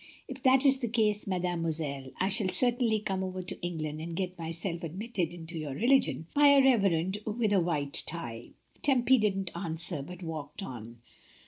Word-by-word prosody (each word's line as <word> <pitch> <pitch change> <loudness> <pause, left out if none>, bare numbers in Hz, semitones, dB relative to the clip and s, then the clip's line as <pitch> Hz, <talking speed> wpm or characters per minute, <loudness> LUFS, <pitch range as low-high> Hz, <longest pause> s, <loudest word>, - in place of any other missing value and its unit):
"If 260 0 -8
that 260 +2 +4
is 270 -1 +5
the 240 - -2
case, 215 -3 +1
mademoiselle, 165 -7 -2
I 190 - +1
shall 200 -1 +2
cer 245 +5 +4
tainly 225 -3 0
come 190 -1 -1
over 185 0 -4
to 180 - -6
England 155 -3 -4
and 165 +1 -5
get 185 0 -3
myself 170 +1 -3
ad 165 0 -5
mitted 195 -5 -2
into 165 -1 -7
your 145 -3 -5
religion 250 - +2
by 290 0 +6
a 280 -1 +7
reverend 195 -7 +2
with 215 -1 0
a 195 - +4
white 150 -5 -1
tie." 120 -8 -6 0.3
Tempy 260 -2 +4
didn't 195 -4 0
answer, 170 -2 -2
but 180 +5 -9
walked 155 +2 -6
on. 115 - -9
185 Hz, 185 wpm, -29 LUFS, 165-220 Hz, 0.3 s, a